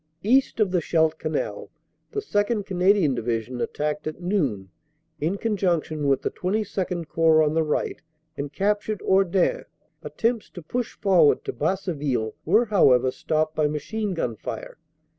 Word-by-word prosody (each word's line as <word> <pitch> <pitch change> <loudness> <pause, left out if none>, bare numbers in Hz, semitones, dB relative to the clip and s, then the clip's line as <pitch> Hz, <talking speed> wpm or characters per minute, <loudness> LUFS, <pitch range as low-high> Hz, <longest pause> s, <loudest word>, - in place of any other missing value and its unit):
East 255 +3 +2
of 205 -4 +2
the 180 -2 +1
Scheldt 160 0 +1
Canal 155 -1 -3 0.4
the 420 - -3
2nd. 205 - 0
Canadian 185 -5 +3
Division 120 +1 -3
attacked 150 +1 -2
at 155 - -5
noon 140 - -1 0.5
in 165 +7 -1
con 220 0 -1
junction 160 -6 0
with 135 -1 +2
the - - -1
XXII 185 -3 -2
Corps 160 0 +4
on 150 0 +1
the 165 - +2
right 150 -1 -2 0.3
and 140 0 -5
captured 205 +4 -1
Hordain. 195 - +2 0.4
Attempts 230 -1 -1
to 175 - -10
push 245 +9 -3
forward 180 -7 +3
to - - -3
Basseville 145 - -1
were, 215 +9 +4
how 205 - +4
ever, 125 +1 +3
stopped 155 +3 -1
by 155 -1 +2
machine 195 +7 -3
gun 120 -8 -2
fire. 110 +7 -7
170 Hz, 155 wpm, -24 LUFS, 150-205 Hz, 0.5 s, Corps